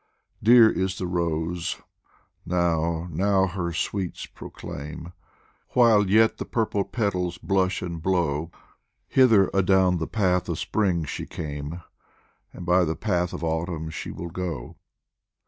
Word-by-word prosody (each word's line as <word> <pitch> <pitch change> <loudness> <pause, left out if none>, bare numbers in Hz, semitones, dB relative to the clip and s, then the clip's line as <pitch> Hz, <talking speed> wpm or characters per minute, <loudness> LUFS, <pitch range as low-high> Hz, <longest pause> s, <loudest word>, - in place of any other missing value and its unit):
Dear 115 +1 +8
is 95 -2 -1
the 95 - -3
rose 85 -1 -2 0.7
now, 85 -1 0
now 95 +3 +2
her 85 -2 -3
sweets 90 +2 -3
proclaim, 80 +4 -9 0.6
While 110 -5 +5
yet 110 +2 +4
the - - -3
purple 110 -3 0
petals 90 -6 -2
blush 95 -1 0
and 85 -2 -5
blow; 80 -4 0 0.6
Hither 115 -8 +5
adown 95 -2 +3
the 80 - -2
path 90 -5 +1
of - - -2
Spring 90 -7 0
she - - -5
came, 75 +2 -6 0.7
And 90 - -9
by 90 +1 +4
the 80 -1 -1
path 90 -5 -1
of - - -6
Autumn 80 0 -2
she 80 - -6
will 85 - -6
go. 85 -8 -5
90 Hz, 130 wpm, -25 LUFS, 85-95 Hz, 0.7 s, Dear